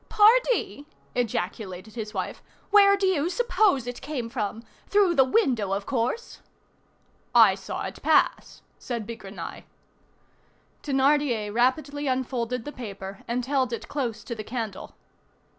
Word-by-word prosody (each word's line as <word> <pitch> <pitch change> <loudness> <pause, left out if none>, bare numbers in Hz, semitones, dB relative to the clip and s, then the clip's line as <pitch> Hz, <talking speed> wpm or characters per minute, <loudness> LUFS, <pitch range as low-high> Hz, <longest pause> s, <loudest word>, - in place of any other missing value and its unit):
"Pardie!" 440 - +3 0.3
ejaculated 205 -3 -3
his 220 -3 -5
wife, - - -4 0.3
"where 400 -1 +7
do 395 - 0
you 345 -4 +2
suppose 420 - +2
it 245 0 -6
came 265 -6 -4
from? 225 -2 -3 0.2
Through 400 -4 +4
the 270 - +6
window, 255 - +1
of 200 0 -2
course." 260 - -2 1.0
"I - - +8
saw - - -5
it - - -7
pass," - - +2 0.2
said 235 -4 -4
Bigrenaille. 215 -3 -8 1.2
Thénardier 270 -6 +1
rapidly 280 +4 +1
unfolded 250 -2 -2
the 295 - -5
paper 200 -6 -8
and 240 +1 -1
held 265 -2 +1
it 235 - -5
close 250 -6 -3
to 235 - -5
the 215 -2 -6
candle. 220 -3 -5
250 Hz, 130 wpm, -26 LUFS, 225-295 Hz, 1.2 s, I